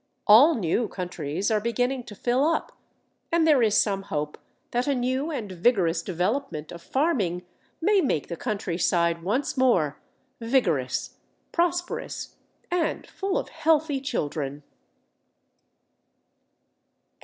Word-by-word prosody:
All 265 Hz, +11 st, +8 dB
new 215 Hz, +3 st, 0 dB
countries 180 Hz, 0 st, -3 dB
are 215 Hz, -1 st, +2 dB
beginning 245 Hz, +3 st, -1 dB
to 210 Hz, -, -10 dB
fill 245 Hz, +6 st, +1 dB
up, 330 Hz, +2 st, 0 dB, 0.6 s
and 335 Hz, -1 st, +3 dB
there 300 Hz, -5 st, +5 dB
is 215 Hz, -3 st, +4 dB
some 195 Hz, -2 st, +1 dB
hope 150 Hz, -6 st, -4 dB, 0.3 s
that 245 Hz, +2 st, 0 dB
a 280 Hz, -, +2 dB
new 260 Hz, +4 st, -1 dB
and 230 Hz, -11 st, -4 dB
vigorous 175 Hz, -3 st, +2 dB
development 185 Hz, -, -2 dB
of 170 Hz, -, -9 dB
farming 205 Hz, -, 0 dB, 0.3 s
may 400 Hz, +3 st, +3 dB
make 160 Hz, -, 0 dB
the 170 Hz, -, -4 dB
countryside 170 Hz, -5 st, 0 dB
once 250 Hz, -, -1 dB
more 180 Hz, -, +2 dB, 0.4 s
vigorous, 200 Hz, -, 0 dB, 0.3 s
prosperous, 350 Hz, 0 st, -2 dB, 0.4 s
and 355 Hz, -2 st, 0 dB
full 390 Hz, 0 st, -2 dB
of -, -, -3 dB
healthy 310 Hz, -3 st, +1 dB
children. 145 Hz, -, -3 dB
230 Hz, 120 wpm, -26 LUFS, 175-280 Hz, 0.6 s, All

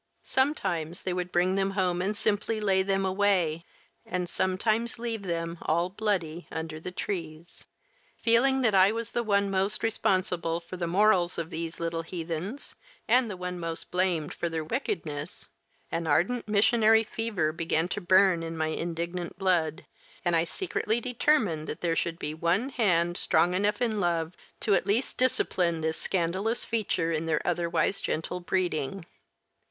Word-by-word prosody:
Sometimes 180 Hz, -, 0 dB
they 185 Hz, -, -1 dB
would 180 Hz, 0 st, -3 dB
bring 180 Hz, +2 st, +2 dB
them 195 Hz, 0 st, +1 dB
home 180 Hz, -2 st, +1 dB
and 205 Hz, +3 st, -1 dB
simply 215 Hz, +1 st, 0 dB
"lay 195 Hz, -3 st, +2 dB
them 195 Hz, 0 st, 0 dB
away," 185 Hz, -4 st, +1 dB, 0.4 s
and 180 Hz, -1 st, -3 dB
sometimes 215 Hz, +7 st, 0 dB
leave 230 Hz, -2 st, -3 dB
them, 170 Hz, -2 st, -3 dB
all 170 Hz, +3 st, +1 dB
bloody, 185 Hz, -5 st, -2 dB
under 160 Hz, -1 st, -5 dB
the 165 Hz, -, -6 dB
trees. 170 Hz, -3 st, -5 dB, 0.5 s
Feeling 265 Hz, +4 st, +3 dB
that 225 Hz, -5 st, +3 dB
I 190 Hz, +1 st, +6 dB
was 230 Hz, +1 st, -4 dB
the 240 Hz, -, 0 dB
one 200 Hz, -3 st, +1 dB
most 195 Hz, +2 st, 0 dB
responsible 185 Hz, -6 st, 0 dB
for 170 Hz, +2 st, -9 dB
the 175 Hz, -1 st, -2 dB
morals 180 Hz, -1 st, +3 dB
of 165 Hz, 0 st, -4 dB
these 165 Hz, 0 st, -4 dB
little 165 Hz, 0 st, -2 dB
heathens, 170 Hz, -, -5 dB, 0.3 s
and 250 Hz, -2 st, +4 dB
the 190 Hz, -, -5 dB
one 180 Hz, 0 st, -4 dB
most 165 Hz, -1 st, -4 dB
blamed 180 Hz, -4 st, 0 dB
for 170 Hz, -, -2 dB
their 160 Hz, -1 st, -2 dB
wickedness, 160 Hz, -, -4 dB, 0.4 s
an 165 Hz, -1 st, -2 dB
ardent 185 Hz, +12 st, +1 dB
missionary 220 Hz, +1 st, +4 dB
fever 210 Hz, -8 st, -1 dB
began 165 Hz, 0 st, 0 dB
to 205 Hz, -, -3 dB
burn 185 Hz, -1 st, +4 dB
in 165 Hz, 0 st, -5 dB
my 160 Hz, 0 st, 0 dB
indignant 170 Hz, +2 st, -4 dB
blood, 170 Hz, -5 st, +1 dB, 0.4 s
and 175 Hz, -1 st, +3 dB
I 165 Hz, 0 st, +3 dB
secretly 225 Hz, -, -1 dB
determined 235 Hz, -, +1 dB
that -, -, -5 dB
there 165 Hz, -2 st, +1 dB
should 165 Hz, 0 st, -1 dB
be 150 Hz, -2 st, -4 dB
one 170 Hz, -, +1 dB
hand, 175 Hz, -8 st, +2 dB
strong 175 Hz, +1 st, +3 dB
enough 205 Hz, +4 st, +1 dB
in 220 Hz, -3 st, 0 dB
love, 170 Hz, -2 st, 0 dB, 0.3 s
to 210 Hz, -, +2 dB
at 195 Hz, -, +2 dB
least 220 Hz, +6 st, 0 dB
discipline 180 Hz, -9 st, +2 dB
this 160 Hz, 0 st, -1 dB
scandalous 190 Hz, +6 st, 0 dB
feature 195 Hz, -7 st, 0 dB
in 160 Hz, 0 st, -1 dB
their 155 Hz, -2 st, 0 dB
otherwise 175 Hz, +2 st, 0 dB
gentle 165 Hz, +3 st, -2 dB
breeding. 175 Hz, -2 st, -1 dB
180 Hz, 160 wpm, -28 LUFS, 165-210 Hz, 0.5 s, I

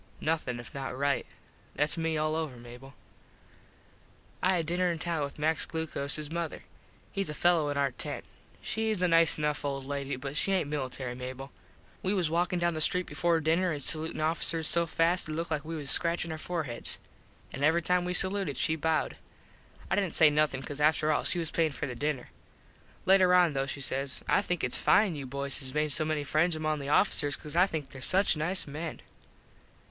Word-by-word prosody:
Nothin 150 Hz, -6 st, -1 dB
if 120 Hz, -, -10 dB
not 135 Hz, -2 st, -5 dB
right. 140 Hz, 0 st, 0 dB, 0.5 s
Thats 150 Hz, +2 st, 0 dB
me 165 Hz, -1 st, -1 dB
all 155 Hz, 0 st, 0 dB
over, 155 Hz, -6 st, -3 dB
Mable. 120 Hz, +3 st, -12 dB, 1.5 s
I 185 Hz, +1 st, +3 dB
had 165 Hz, -2 st, -1 dB
dinner 175 Hz, +2 st, +1 dB
in 170 Hz, -, -3 dB
town 165 Hz, 0 st, -2 dB
with 140 Hz, -, -6 dB
Max 155 Hz, +2 st, 0 dB
Glocoses 155 Hz, -2 st, -2 dB
mother. 170 Hz, -1 st, -4 dB, 0.5 s
Hes 195 Hz, -4 st, -2 dB
a 150 Hz, -, -5 dB
fello 170 Hz, -4 st, +3 dB
in 145 Hz, -, -2 dB
our 140 Hz, -1 st, +1 dB
tent. -, -, -4 dB, 0.4 s
Shes 220 Hz, -4 st, -1 dB
a -, -, +4 dB
nice 165 Hz, -1 st, +4 dB
enough 150 Hz, -1 st, -1 dB
old 135 Hz, -1 st, -3 dB
lady 140 Hz, 0 st, -3 dB
but 135 Hz, +2 st, -6 dB
she 195 Hz, +5 st, +1 dB
aint 185 Hz, -6 st, +1 dB
military, 130 Hz, -3 st, -3 dB
Mable. 130 Hz, +2 st, -7 dB, 0.5 s
We 190 Hz, +2 st, 0 dB
was 175 Hz, -5 st, 0 dB
walkin 175 Hz, +2 st, +1 dB
down 175 Hz, 0 st, +1 dB
the 155 Hz, -, -1 dB
street 180 Hz, +3 st, +5 dB
before 170 Hz, -1 st, +1 dB
dinner 170 Hz, +4 st, +2 dB
an 150 Hz, -, -3 dB
salutin 155 Hz, +2 st, -1 dB
officers 160 Hz, 0 st, 0 dB
so 170 Hz, 0 st, +3 dB
fast 165 Hz, +1 st, +1 dB
it -, -, -3 dB
looked 165 Hz, +1 st, -3 dB
like 150 Hz, -2 st, -1 dB
we 165 Hz, +1 st, -5 dB
was 145 Hz, -3 st, -1 dB
scratchin 170 Hz, 0 st, +2 dB
our 160 Hz, -, -5 dB
forheds. 155 Hz, -9 st, -3 dB, 0.6 s
An 140 Hz, -, -4 dB
every 160 Hz, +3 st, +3 dB
time 180 Hz, +1 st, +2 dB
we 180 Hz, 0 st, -2 dB
saluted 190 Hz, -8 st, +1 dB
she 160 Hz, -, +1 dB
bowed. 160 Hz, 0 st, -1 dB, 0.7 s
I -, -, +3 dB
didnt 195 Hz, -4 st, 0 dB
say 155 Hz, -2 st, +7 dB
nothin 145 Hz, -3 st, +1 dB
cause 145 Hz, +1 st, -5 dB
after 155 Hz, 0 st, +3 dB
all 150 Hz, -, 0 dB
she -, -, +3 dB
was 165 Hz, -2 st, -1 dB
payin 160 Hz, -3 st, +1 dB
for 150 Hz, -, -4 dB
the 130 Hz, -, -5 dB
dinner. 140 Hz, 0 st, -3 dB, 0.7 s
Later 185 Hz, -1 st, +5 dB
on 175 Hz, -4 st, +4 dB
though 135 Hz, 0 st, -1 dB
she 140 Hz, -, -5 dB
says. 135 Hz, 0 st, -1 dB
"I -, -, +3 dB
think 180 Hz, -4 st, -2 dB
its 125 Hz, -, +2 dB
fine 205 Hz, -4 st, +4 dB
you 140 Hz, -3 st, -6 dB
boys 140 Hz, +1 st, -3 dB
has 130 Hz, 0 st, -7 dB
made 150 Hz, 0 st, +1 dB
so 155 Hz, +2 st, +1 dB
many 155 Hz, -1 st, -1 dB
friends 160 Hz, +4 st, +2 dB
among 155 Hz, -1 st, -1 dB
the 140 Hz, 0 st, -5 dB
officers 145 Hz, -4 st, +2 dB
cause 150 Hz, +1 st, -8 dB
I 180 Hz, +3 st, +5 dB
think 155 Hz, -7 st, -5 dB
there 130 Hz, -, -11 dB
such 190 Hz, +6 st, +3 dB
nice 170 Hz, +5 st, 0 dB
men." 155 Hz, +3 st, -6 dB
155 Hz, 205 wpm, -29 LUFS, 140-170 Hz, 1.5 s, say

